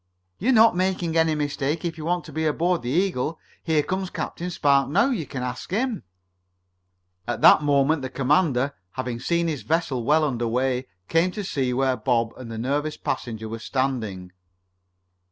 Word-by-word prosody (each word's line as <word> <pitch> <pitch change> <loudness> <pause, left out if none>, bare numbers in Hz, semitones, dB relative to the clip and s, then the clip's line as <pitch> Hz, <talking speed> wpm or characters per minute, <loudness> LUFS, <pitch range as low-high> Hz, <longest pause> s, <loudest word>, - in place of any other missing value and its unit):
"You're 245 +7 +2
not 225 -4 +6
making 180 -2 0
any 160 -1 +3
mistake 145 +2 -2
if 170 - -2
you 155 -1 -7
want 175 0 0
to - - -11
be 160 0 0
aboard 170 +3 +1
the 120 - -4
Eagle. 165 -2 0 0.2
Here 160 -3 +1
comes 185 +2 -2
Captain 175 0 -4
Spark 140 -5 +2
now. 200 - +3
You 180 - -2
can 130 -2 -5
ask 125 -1 -5
him." 225 +3 -1 1.3
At 120 - -3
that - - +8
moment 145 +1 +2
the 130 - -4
commander, 140 0 +1 0.2
having 125 -2 -4
seen 170 +6 0
his 150 -6 -2
vessel 140 -1 -1
well 155 +5 +3
under 120 -5 -1
way, 125 +2 0 0.2
came 165 +2 +2
to 140 -11 -2
where 130 0 +2
Bob 115 -1 0
and 125 -3 -9
the 110 - -5
nervous 145 +6 -1
passenger 110 -2 -4
were 115 +1 -6
standing. 110 -8 -2
145 Hz, 170 wpm, -24 LUFS, 125-170 Hz, 1.3 s, that